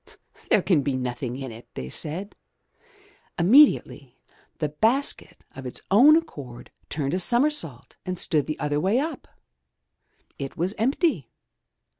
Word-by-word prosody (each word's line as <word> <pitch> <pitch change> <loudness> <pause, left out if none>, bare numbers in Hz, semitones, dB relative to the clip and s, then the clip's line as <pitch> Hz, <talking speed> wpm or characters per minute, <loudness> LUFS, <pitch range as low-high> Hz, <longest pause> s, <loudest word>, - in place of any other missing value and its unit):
"There - - +3
can 170 -7 +3
be 135 -1 -1
nothing 125 0 -4
in 135 -2 -6
it," 115 +2 -12
they 65 - -5
said. 165 - -4 1.0
Inmiediately 240 - +4 0.4
the 150 - -2
basket 225 - -1
of 135 -1 -7
its 125 - -8
own 265 +10 +7
accord 140 - -5 0.2
turned 145 -2 -2
a 180 - 0
somersault 240 - 0
and 185 0 -4
stood 155 -5 0
the 155 - -3
other 150 -1 -1
way 190 +8 +1
up. 310 +5 -3 1.1
It 135 -1 -6
was 180 +4 -1
empty. 250 - 0
160 Hz, 135 wpm, -24 LUFS, -, 1.1 s, own